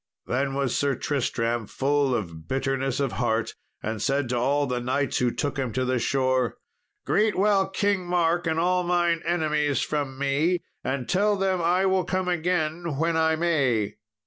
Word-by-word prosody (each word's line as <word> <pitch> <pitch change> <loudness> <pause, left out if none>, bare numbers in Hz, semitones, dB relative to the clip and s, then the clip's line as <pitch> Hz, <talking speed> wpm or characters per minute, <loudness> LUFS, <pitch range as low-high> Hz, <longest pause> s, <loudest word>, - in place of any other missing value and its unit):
Then 135 +2 -1
was 135 -3 0
Sir 140 -2 +1
Tristram 120 -5 -1
full 140 -1 +1
of 85 -7 -5
bitterness 135 0 -1
of 135 -3 0
heart, 115 +1 -1 0.3
and 110 -1 -3
said 135 0 0
to 125 - 0
all 140 +4 +1
the 125 -2 -2
knights 130 +3 -1
who 125 - +2
took 145 +3 -3
him 130 -3 -1
to 130 +3 0
the 130 0 +1
shore, 130 -2 +1 0.5
"Greet 210 0 +2
well 195 -1 +3
King 195 -1 0
Mark 175 0 +1
and 160 0 +1
all 180 +2 +2
mine 175 -1 +1
enemies 150 -4 +1
from 140 -3 -3
me, 145 +6 +1 0.2
and 130 -2 -2
tell 205 +2 +2
them 190 -2 0
I 180 +3 +2
will 190 -1 +2
come 185 +1 -2
again 170 -3 -1
when 165 +2 +1
I 160 0 +3
may. 135 -11 +1
145 Hz, 175 wpm, -25 LUFS, 130-175 Hz, 0.5 s, well